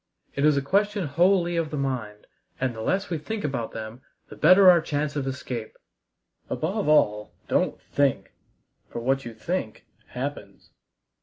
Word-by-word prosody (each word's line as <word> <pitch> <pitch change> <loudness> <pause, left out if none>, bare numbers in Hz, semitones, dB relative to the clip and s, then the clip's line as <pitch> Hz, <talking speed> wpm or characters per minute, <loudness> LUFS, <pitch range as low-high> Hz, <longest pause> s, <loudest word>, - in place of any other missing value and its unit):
It 140 - +1
is 150 -2 +4
a 140 - 0
question 200 +4 +1
wholly 175 +4 +2
of 165 -2 0
the 150 - -4
mind, 125 -7 -3 0.3
and 130 -1 0
the 110 - -7
less 190 - -1
we 165 - -1
think 215 +7 -5
about 130 -6 -2
them 110 +2 -7 0.3
the - - -10
better 185 +5 +6
our 175 -2 +8
chance 145 -1 -2
of 140 -2 -2
escape. 125 -4 -5 0.7
Above 190 +2 -1
all, 105 -8 +3
don't - - 0
think, 140 -2 0 0.6
for - - -8
what 135 +2 0
you 115 -1 -7
think 115 -2 -4 0.2
happens!" 135 +4 -7
145 Hz, 160 wpm, -25 LUFS, 125-175 Hz, 0.7 s, our